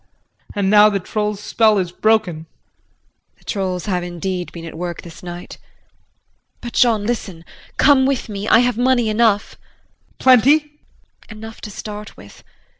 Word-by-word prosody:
And 200 -1 +1
now 210 0 +7
the 200 -1 -1
troll's 210 +1 -3
spell 215 0 +2
is 180 -3 -1
broken. 215 -2 +2
JULIE. 160 +1 -10 0.9
The - - -27
trolls 185 -3 -3
have 185 -4 -1
indeed 180 +1 -4
been 165 -1 -9
at 165 - -8
work 175 0 -5
this 170 -2 -12
night. 175 0 -9 1.0
But, 240 -1 -8
Jean, 225 -4 +3
listen 195 -8 -4 0.3
come 270 -2 +5
with 275 -2 -1
me, 205 0 -4
I 230 - +6
have 245 -1 0
money 245 -2 +2
enough. 215 -1 +2
JEAN. - - -27
Plenty? 260 +4 +5
JULIE. 300 0 -26 0.6
Enough 220 0 -10
to - - -7
start 210 +1 -8
with. 100 - -15
210 Hz, 160 wpm, -19 LUFS, 180-230 Hz, 1.0 s, now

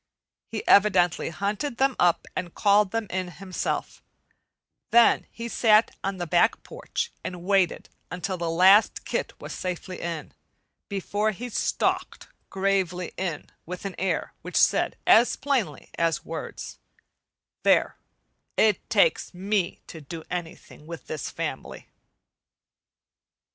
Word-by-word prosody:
He - - -6
evidently 185 -6 +4
hunted 205 - -3
them 270 0 +2
up 175 -1 +3
and 175 -2 -4
called 205 -1 +4
them 225 +2 -2
in 185 0 -2
himself; 185 +2 -4 0.9
then 235 0 +5
he 230 0 -7
sat 220 -1 +3
on 195 0 -2
the 175 - -3
back 175 +1 +2
porch 475 -1 -4
and 180 -1 -6
waited 190 -2 +1 0.2
until 180 +1 -3
the 170 -2 -3
last 190 +6 +5
kit - - -3
was - - -7
safely 185 0 -5
in, 165 -3 -5 0.6
before 205 +2 -1
he 235 +4 -5
stalked - - -1 0.2
gravely 190 -2 -1
in 175 -6 -4 0.2
with 180 +2 -7
an 195 - -3
air 190 - -1
which - - -4
said - - +3
as 235 +2 +6
plainly 245 - -2
as 165 -3 0
words: 160 0 -7 0.8
"There, - - +3 0.6
it 215 -3 +2
takes 485 - +2
me 195 0 -1
to 160 - -10
do 160 +3 -8
anything 165 -3 -7
with 170 -1 -8
this 155 -4 -5
family." - - -5
190 Hz, 125 wpm, -26 LUFS, 175-210 Hz, 0.9 s, as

